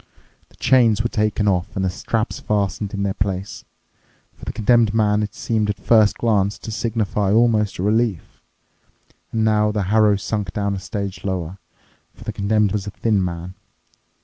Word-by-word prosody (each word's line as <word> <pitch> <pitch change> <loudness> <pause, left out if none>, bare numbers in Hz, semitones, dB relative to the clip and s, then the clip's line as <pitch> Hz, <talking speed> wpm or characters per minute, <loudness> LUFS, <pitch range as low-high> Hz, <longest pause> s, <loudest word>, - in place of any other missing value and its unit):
The - - -24
chains 115 -4 +3
were 120 - -1
taken 105 -2 0
off 95 +1 0
and 95 -1 0
the - - +1
straps 110 +5 -2
fastened 100 -1 -1
in 100 - -2
their 100 -1 0
place. 100 0 -3 0.7
For - - -13
the - - -3
Condemned 110 0 +2
Man 105 -1 +2
it 105 - -4
seemed 110 -2 -1
at 105 - -1
first 110 0 +4
glance 100 -3 +1
to 110 - -8
signify 110 -3 -1
almost 110 -2 +2
a 90 - -3
relief. 110 -3 -1 0.9
And 110 -1 0
now 105 -1 +2
the 105 -1 -1
harrow 105 -2 +5
sunk 100 -1 -3
down 100 0 -1
a 95 - -3
stage 100 +1 -5
lower, 95 -1 -3 0.6
for - - -13
the - - -5
Condemned 105 0 +1
was 105 -1 -3
a - - -2
thin 105 -1 0
man. 85 0 -5
105 Hz, 175 wpm, -21 LUFS, 100-110 Hz, 0.9 s, harrow